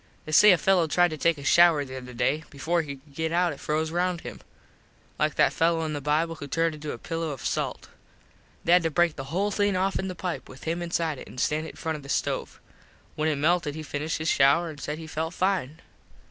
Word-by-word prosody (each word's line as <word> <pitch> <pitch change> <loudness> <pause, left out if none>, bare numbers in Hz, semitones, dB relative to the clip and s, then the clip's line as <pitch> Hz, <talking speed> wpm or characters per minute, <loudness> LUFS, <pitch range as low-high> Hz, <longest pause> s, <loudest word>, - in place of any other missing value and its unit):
They 155 - -6
say 210 +7 +8
a 180 - +5
fello 180 0 +3
tried 175 +3 +3
to 155 - -5
take 165 +2 +2
a 140 - -9
shouer 165 -1 +5
the 130 -1 -8
other 125 -1 -8
day. 135 +6 0
Before 165 +5 0
he 145 -3 -6
could 140 +1 -21
get 160 +2 -2
out 175 -1 +2
it 140 - -12
froze 155 +1 -1
round 175 0 0
him. - - -9 0.8
Like - - +1
that - - +3
fello 165 0 +1
in 155 - -3
the 145 - -4
bible 155 +3 +1
who 145 -3 -8
turned 165 +3 0
into 150 0 -6
a - - -6
pillo 165 +6 -4
of 140 -4 -6
salt. - - -2 0.8
They 170 - +1
had 180 +1 +7
to 165 - 0
break 170 0 +2
the 135 - -6
whole 190 +9 -1
thing 205 -1 +1
offen 190 +1 0
the 185 - -5
pipe 180 -1 -5
with 130 - -12
him 165 +2 -2
inside 165 -4 -1
it - - -10
an - - -12
stand 155 +4 0
it - - -9
in - - -18
front 160 -1 -3
of - - -11
the 140 - -12
stove. - - -2 0.5
When 155 +1 0
it 155 - +1
melted 150 0 +1
he 155 - -6
finished 150 +1 -3
his 160 - -4
shouer 160 +5 +3
an 145 - -11
said 150 +1 -4
he 160 - -8
felt 160 +2 -4
fine. 180 -6 -1
160 Hz, 250 wpm, -26 LUFS, 150-175 Hz, 0.8 s, say